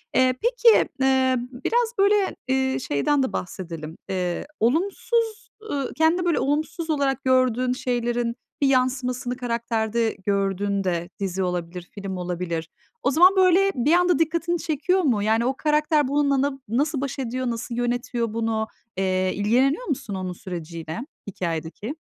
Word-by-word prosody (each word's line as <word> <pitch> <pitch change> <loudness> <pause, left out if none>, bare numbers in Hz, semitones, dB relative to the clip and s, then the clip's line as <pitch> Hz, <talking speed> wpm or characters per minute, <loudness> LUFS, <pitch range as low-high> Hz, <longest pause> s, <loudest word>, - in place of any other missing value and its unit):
Eee, 255 0 +4
peki, 475 -1 +4
ııı, 265 -1 +3 0.3
biraz 475 0 +1
böyle, 400 0 +3
eee, 265 0 +1
şeyden 265 - +1
de 260 - -2
bahsedelim. 165 -4 -6
Eee, 180 -2 -2
olumsuz, 425 - 0 0.2
ııı, 275 -2 -2
kendinde 325 +3 +2
böyle 340 -3 +2
olumsuz 310 +3 -1
olarak 275 -3 0
gördüğün 255 -1 +2
şeylerin 240 -1 -1 0.3
bir 280 - +4
yansımasını 255 -1 0
karakterde 235 -2 -1
gördüğünde, 195 -3 0
dizi 190 -1 -1
olabilir, 180 0 -4
film 195 -2 -5
olabilir, 175 -2 -3 0.3
o 270 - +3
zaman 360 +7 +6
böyle 380 +1 +5
bir 270 +7 +2
anda 355 -1 +4
dikkatini 335 +2 +1
çekiyor 330 +5 +1
mu? 240 - +1
Yani 220 +2 +2
o 260 +1 0
karakter 300 -1 +2
bununla 280 -1 +2
na 275 -1 -1
nasıl 275 +5 0
baş 275 0 -4
ediyor, 255 0 -2
nasıl 235 +1 -4
yönetiyor 240 -1 -1
bunu? 225 -1 -1 0.3
Eee, 185 -1 +1
ilgileniyor 255 - +2
musun 235 -8 -3
onun 185 -1 -4
süreciyle 170 -2 -6 0.3
hikâyedeki? 175 - -4
250 Hz, 140 wpm, -24 LUFS, 200-295 Hz, 0.3 s, zaman